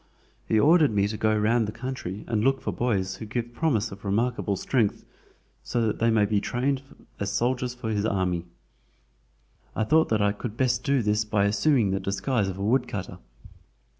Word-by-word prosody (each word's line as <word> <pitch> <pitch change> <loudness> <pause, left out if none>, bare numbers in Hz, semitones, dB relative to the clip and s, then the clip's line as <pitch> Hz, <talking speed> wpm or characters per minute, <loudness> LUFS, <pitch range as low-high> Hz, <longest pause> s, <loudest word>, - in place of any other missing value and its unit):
He 110 - +3
ordered 155 +3 +5
me 100 -1 +1
to 105 - -4
go 110 0 +1
round 110 +1 +2
the - - -3
country 115 -6 -6
and 110 -2 0
look 135 +1 +2
for - - -4
boys 95 -6 -1
who 110 - -7
give 120 +2 -4
promise 120 -6 0
of 95 +1 -11
remarkable 105 0 0
strength, 110 +1 0 0.6
so 120 -2 -1
that 110 - -1
they 115 - +3
may 110 -2 +3
be 100 -1 +1
trained 130 +4 -1 0.4
as 100 0 -2
soldiers 125 +3 -1
for 115 -3 -4
his 105 -1 0
army. 90 -5 0 1.3
I 110 - +1
thought 160 +9 +3
that 110 - +2
I 100 0 +3
could 105 +2 -6
best 125 -1 +1
do 135 -3 +1
this 105 +1 +1
by 105 -2 +1
assuming 110 0 +2
the 95 - 0
disguise 100 +3 -1
of 95 -1 -4
a 100 - -4
woodcutter. 105 -4 -1
110 Hz, 190 wpm, -26 LUFS, 100-125 Hz, 1.3 s, ordered